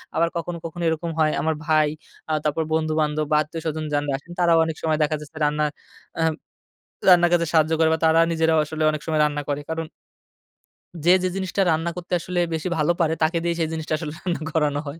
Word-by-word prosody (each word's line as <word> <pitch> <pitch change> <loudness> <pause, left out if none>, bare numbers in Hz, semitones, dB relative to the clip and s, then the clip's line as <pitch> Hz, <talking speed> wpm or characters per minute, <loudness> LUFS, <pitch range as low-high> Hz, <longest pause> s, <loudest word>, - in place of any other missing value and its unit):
আবার 170 - +3
কখনো, 170 +1 -4
কখনো 170 +1 -5
এরকম 165 +1 -2
হয় 155 -1 +3
আমার 160 0 0
ভাই, 155 -1 +3 0.4
আ - - +1
তারপর 155 +2 0
বন্ধু-বান্ধব 155 -1 0
বা - - +4
আত্মীয়স্বজন 155 0 -4
যান 145 0 +1
আসেন, 165 +5 -16
তারাও 170 -1 +4
অনেক 160 - -3
সময় 160 -1 +1
দেখা 155 +1 0
যায় 150 -1 -10 0.2
রান্না 150 +1 +1 0.5
আহাম 160 -1 +2 0.8
রান্নার 175 -2 +7
কাজে 170 -1 +3
সাহায্য 160 -1 +3
করে 160 - +5
বা 160 - -2
তারা 160 +1 +5
নিজেরাও 160 -1 +2
আসলে 155 +1 -4
অনেক 150 0 -4
সময় 155 -1 +1
রান্না 145 0 -1
করে। 145 0 -1
কারণ 160 0 -3 1.2
যে 175 - +6
যে - - +2
জিনিসটা 195 0 -1
রান্না 165 +2 0
করতে 180 0 -6
আসলে 180 +1 -3
বেশি 160 +2 -2
ভালো 155 +2 +2
পারে, 160 -2 +2
তাকে 165 +2 +2
দিয়েই 170 -1 -1
সেই 160 - 0
জিনিসটা 160 -1 -3
আসলে 155 -1 -5
রান্না 175 -3 -3
করানো 150 -2 +1
হয়। 145 +4 -7
160 Hz, 205 wpm, -23 LUFS, 155-170 Hz, 1.2 s, রান্নার